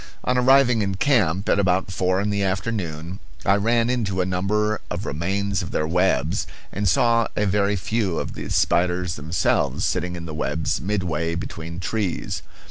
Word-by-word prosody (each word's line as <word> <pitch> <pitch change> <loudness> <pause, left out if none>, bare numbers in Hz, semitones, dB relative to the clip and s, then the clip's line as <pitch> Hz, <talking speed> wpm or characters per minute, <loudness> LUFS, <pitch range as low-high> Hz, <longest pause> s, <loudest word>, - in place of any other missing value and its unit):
On 125 - +1
arriving 125 -2 +5
in 100 -2 -1
camp, 100 - +2
at - - +3
about 95 -1 +1
four 95 0 +1
in 105 +1 0
the 100 0 0
afternoon, 95 -3 -3 0.3
I 100 - +5
ran 115 +3 +2
into 110 -7 -1
a 90 - +2
number 105 +4 0
of - - -4
remains 95 +5 -1
of 85 - -5
their 75 - -1
webs, 90 0 +1 0.2
and 100 -1 0
saw 115 +4 +3
a 105 - +1
very 100 +1 +2
few 95 0 -1
of - - -3
the - - -6
spiders 90 0 +1
themselves 80 +3 0
sitting 90 0 -1
in 85 -1 -6
the 80 - -6
webs 75 -2 -1
midway 85 -3 -1
between 85 -1 -6
trees. 100 -1 -2
95 Hz, 170 wpm, -23 LUFS, 85-105 Hz, 0.3 s, arriving